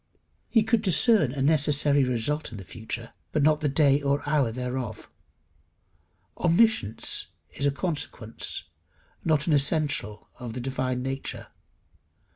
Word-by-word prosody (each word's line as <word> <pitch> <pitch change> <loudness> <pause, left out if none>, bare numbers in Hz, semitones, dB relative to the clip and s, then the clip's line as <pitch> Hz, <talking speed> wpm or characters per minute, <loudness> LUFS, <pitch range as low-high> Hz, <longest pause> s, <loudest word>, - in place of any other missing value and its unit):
He 225 -3 +4
could 220 0 +1
discern 195 - +4
a 135 0 -2
necessary 145 -1 +4
result 125 +5 -1
in 110 - -8
the 95 - -8
future, 115 +4 -7 0.2
but 150 - +1
not 155 0 +3
the 150 - +1
day 140 0 +3
or 140 0 +1
the 145 - -12
hour 140 -7 +2
thereof. 125 -1 -5 1.3
Omniscience 170 - +1 0.2
is 140 - -1
a - - +2
consequence, 140 -7 -4 0.6
not 155 -3 +1
an 165 - +1
essential 145 -7 +1
of 120 -3 -6
the 125 - -5
divine 130 0 -2
nature. 135 +1 -5
140 Hz, 135 wpm, -26 LUFS, 125-155 Hz, 1.3 s, He